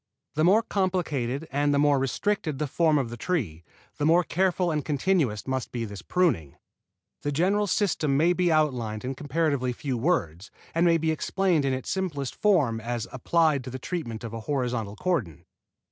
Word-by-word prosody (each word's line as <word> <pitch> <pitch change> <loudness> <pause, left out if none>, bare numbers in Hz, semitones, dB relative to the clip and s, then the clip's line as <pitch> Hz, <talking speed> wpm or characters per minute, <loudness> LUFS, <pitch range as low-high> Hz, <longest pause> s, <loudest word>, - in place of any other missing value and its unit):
The 155 - +1
more 200 +7 +5
complicated 165 - -1
and 145 +1 +1
the 145 - +2
more 145 -1 +4
restricted 155 - -1
the 150 - -1
form 155 +2 +2
of 125 -5 -1
the 120 - -6
tree, 110 - -2 0.4
the 145 - +1
more 170 +2 +5
careful 180 0 +1
and 150 -2 -1
continuous 145 - 0
must 130 -2 -3
be 120 -2 -3
this 100 -3 -8
pruning. 115 - 0 0.7
The 145 - -2
general 195 +8 +1
system 160 -9 +1
may 170 +4 +4
be 180 -1 +1
outlined 125 -8 0
in 130 - -2
comparatively 140 -2 -1
few 130 -1 -3
words, 100 - -1 0.2
and 170 +1 +3
may 165 -1 +5
be 160 0 0
explained 170 -1 +1
in 135 - +1
its 130 -1 -4
simplest 155 -9 -2
form 150 - +2
as 120 0 -3
applied 150 +1 +2
to - - -5
the 130 - -5
treatment 125 -6 -5
of 115 -1 -6
a 115 - -4
horizontal 125 -7 -1
cordon. 125 - -2
145 Hz, 180 wpm, -26 LUFS, 125-170 Hz, 0.7 s, more